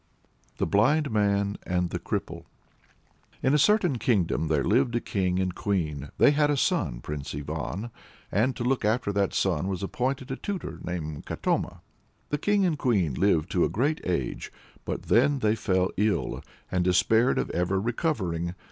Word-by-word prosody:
THE - - 0
BLIND 145 +8 +2
MAN 100 -1 +1
AND 90 -1 -1
THE - - -2
CRIPPLE. - - -4 1.0
In 130 - +3
a 150 - +4
certain 175 - +3
kingdom 95 -8 +1
there 75 -3 +1
lived 125 - +2
a - - +2
king 95 -4 -1
and 90 -1 0
queen; 75 -9 -2
they - - +6
had 150 0 +2
a 145 - +1
son, 75 - 0
Prince 70 0 -5
Ivan, 80 +9 -4 0.4
and 120 +6 +1
to - - -4
look 130 0 0
after 110 0 +1
that 100 -1 0
son 90 -2 +1
was 95 -1 -3
appointed 130 +5 -2
a - - -1
tutor 200 -3 -5
named 80 -4 -5
Katoma. - - -2 0.5
The 150 - -1
king 205 +3 +2
and 160 -5 0
queen 100 - +1
lived 90 +2 +1
to 90 - +2
a - - +2
great 145 +8 0
age, 85 -9 -2 0.3
but - - -3
then 140 +5 +3
they 110 -4 +2
fell 95 -4 0
ill, 105 +1 0 0.3
and 90 -1 +1
despaired 110 +7 +3
of - - -1
ever 90 +2 0
recovering. 95 - -1
100 Hz, 170 wpm, -27 LUFS, 90-130 Hz, 1.0 s, they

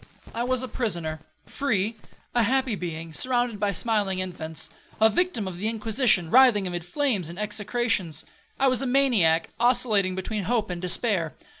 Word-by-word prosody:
I 235 - -3
was 255 +1 0
a - - -3
prisoner,—free,—a 210 - -3
happy 260 +2 +1
being, 165 -4 -5
surrounded 245 +2 0
by 205 0 +1
smiling 205 -2 0
infants,—a 180 +4 -2
victim 250 - 0
of 180 -2 -6
the 210 - -1
Inquisition, 220 -5 +1
writhing 245 -6 +6
amid 175 -2 -4
flames 205 - -1
and 170 - -9
execrations. 210 -5 -1 0.3
I 270 - +4
was 255 0 +2
a 270 - -1
maniac, 230 -12 +3
oscillating 230 -6 +3
between 195 +1 -3
hope 220 -3 0
and 175 -1 -5
despair. 180 -2 0
210 Hz, 145 wpm, -25 LUFS, 180-245 Hz, 0.3 s, writhing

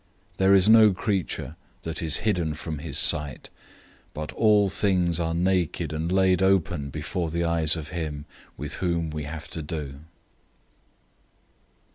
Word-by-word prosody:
004:013 - - -34
There 95 +1 +5
is 95 +1 +5
no 110 -2 +7
creature 90 - -3 0.3
that 80 -1 -5
is 80 -2 +2
hidden 85 -8 0
from 75 0 -6
his 75 -1 -3
sight, 75 -4 +1 0.6
but 75 0 -5
all 105 -2 +3
things 90 -3 +1
are 80 -1 -1
naked 85 -3 0
and 80 +3 -3
laid 95 -1 +3
open 85 -6 +1
before 80 +4 -3
the 85 +2 -2
eyes 85 -1 +1
of 80 -2 -7
him 75 -4 -5 0.3
with 75 -1 -5
whom 85 -3 -1
we 75 -1 -5
have 80 +1 -7
to 80 - -4
do. 75 -3 -6
85 Hz, 150 wpm, -25 LUFS, 75-95 Hz, 0.6 s, no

